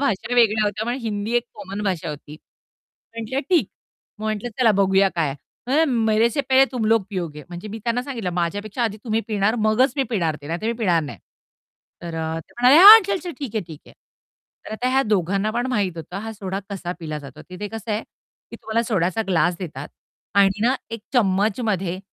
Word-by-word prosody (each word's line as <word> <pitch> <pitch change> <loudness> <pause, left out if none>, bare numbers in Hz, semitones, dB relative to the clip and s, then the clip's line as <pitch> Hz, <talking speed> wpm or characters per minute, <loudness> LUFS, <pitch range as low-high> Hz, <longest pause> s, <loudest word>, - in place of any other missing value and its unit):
भाषा 245 -3 -1
वेगळ्या 220 -3 +4
होत्या, 210 +2 -2
पण 240 - -1
हिंदी 215 0 -3
एक 240 - 0
कॉमन 200 0 -6
भाषा 180 -4 -2
होती. 150 +1 -9 0.8
म्हटलं 230 +4 -2
ठीक. 325 - +3 0.5
मग 215 - -7
म्हटलं 215 +2 -2
चला 230 -4 +5
बघूया 195 0 +3
काय. 155 -5 0
तो 195 - -15
म्हणला, 315 +3 +4 0.3
"मेरे 225 +2 +4
से 285 - 0
पहले 265 0 +4
तुम 240 -3 -2
लोग 225 -1 +3
पिओगे." 170 -6 -5
म्हणजे 175 +4 -8
मी 220 +2 -6
त्यांना 240 +1 0
सांगितलं, 235 -9 -4
"माझ्यापेक्षा 205 +7 -2
आधी 215 -2 -2
तुम्ही 225 -1 0
पिणार, 210 +1 +1
मगच 240 +5 +3
मी 275 - +2
पिणार 170 -9 0
ते 145 - -9
नाहीतर 170 +7 -3
मी 230 - +1
पिणार 175 -7 +2
नाही." 130 - -8 0.8
तर 170 -1 -6
अ, 160 0 -3
ते - - -21
म्हणाले, 255 +4 +7
"हां, 435 +3 +12
चल, 395 -1 0
चल 350 - -4
ठीक 270 -7 -6
है, 220 - +1
ठीक 160 -3 -11
है." - - -15 0.7
तर - - -7
आता 245 +3 -1
ह्या 265 +1 +3
दोघांना 200 +1 +1
पण 240 +3 -1
माहीत 200 -8 -1
होतं 165 +3 -7
हा 225 +1 -6
सोडा 195 -2 -5
कसा 180 -3 -4
पिला 155 -2 -4
जातो. 140 -3 -11
तिथे 205 +3 -6
कसं 225 +1 -7
आहे 210 +2 -1 0.5
की - - -8
तुम्हाला 225 +1 -1
सोड्याचा 195 -2 0
ग्लास 175 -1 +2
देतात 150 -6 -7 0.5
आणि 200 0 +3
ना, 250 +3 +3 0.2
एक 230 -1 -5
चम्मचमध्ये 200 -4 +1
210 Hz, 205 wpm, -22 LUFS, 180-230 Hz, 0.8 s, हां